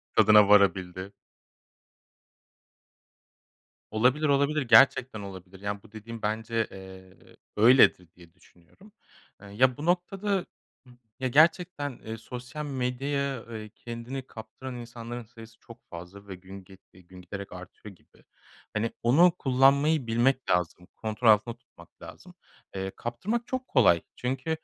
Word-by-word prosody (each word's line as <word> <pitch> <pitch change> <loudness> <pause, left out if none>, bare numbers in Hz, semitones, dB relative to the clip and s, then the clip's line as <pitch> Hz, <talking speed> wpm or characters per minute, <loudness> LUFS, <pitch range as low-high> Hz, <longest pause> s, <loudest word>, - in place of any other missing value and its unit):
Tadına 105 -1 +6
varabildi. 95 -1 +2 2.8
Olabilir, 125 +8 +2
olabilir, 140 +2 +2
gerçekten 130 -2 +4
olabilir. 95 -1 -10
Yani 100 0 -4
bu 110 - -18
dediğin 110 +1 -9
bence, 110 +1 -2
eee, 95 -1 -14 0.2
öyledir 110 -5 +5
diye 85 -2 -18
düşünüyorum. 180 - -22 0.5
Iıı, 100 -1 -12
ya 125 +3 +3
bu 150 - -6
noktada, 190 +2 0 0.4
ımm, 125 -1 -19 0.2
ya 130 - -1
gerçekten, 155 0 +2
eee, 110 0 -5
sosyal 125 +6 -8
medyaya, 135 0 -3
eee, 110 -1 -7
kendini 120 +3 -7
kaptıran 115 +4 -9
insanların 120 0 -8
sayısı 115 0 -15
çok 115 -1 -16
fazla 90 +4 -11
ve 95 - -7
gün 95 +2 -12
ge 95 +1 -16 0.2
eee, 95 - -17
gün 90 +1 -15
giderek 100 +2 -8
artıyor 95 +2 -12
gibi. - - -27 0.5
Hani 110 +1 -1
onu 165 +9 +5
kullanmayı 140 +1 +3
bilmek 125 +4 +1
lazım. 90 0 -1
Kontrol 110 +2 -3
altında 110 +2 +3
tutmak - - -21
lazım. - - -12 0.4
Eee, 95 0 -4
kaptırmak 200 - -3
çok 260 0 -4
kolay 95 - +4
çünkü, 130 +4 -4
115 Hz, 130 wpm, -27 LUFS, 100-135 Hz, 2.8 s, Tadına